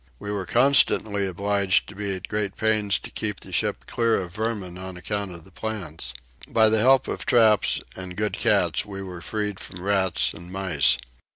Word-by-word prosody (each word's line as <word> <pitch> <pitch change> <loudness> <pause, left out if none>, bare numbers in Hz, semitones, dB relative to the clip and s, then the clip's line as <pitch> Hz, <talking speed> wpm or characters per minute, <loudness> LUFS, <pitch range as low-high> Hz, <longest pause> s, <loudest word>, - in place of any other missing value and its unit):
We 105 - -6
were 100 -3 -3
constantly 110 -5 +3
obliged 100 -1 +1
to 100 - -11
be 100 -1 -2
at 95 - -7
great 100 -2 -2
pains 105 -4 +1
to - - -10
keep - - -2
the - - -10
ship - - -1
clear 115 -1 +1
of 90 -2 -6
vermin 105 -4 -3
on 95 -1 -7
account 100 +3 -3
of 85 -2 -10
the 95 - -18
plants. 85 - -5 0.3
By 110 -1 +4
the 110 0 +3
help 130 +3 +5
of - - -3
traps 110 -4 +4 0.2
and 90 -1 -8
good 105 0 -1
cats - - +2
we 95 -1 -7
were 90 -2 -8
freed 105 -1 -3
from 90 -4 -8
rats 95 -3 +1
and 85 +2 -11
mice. 80 -9 +2
100 Hz, 190 wpm, -25 LUFS, 90-110 Hz, 0.3 s, help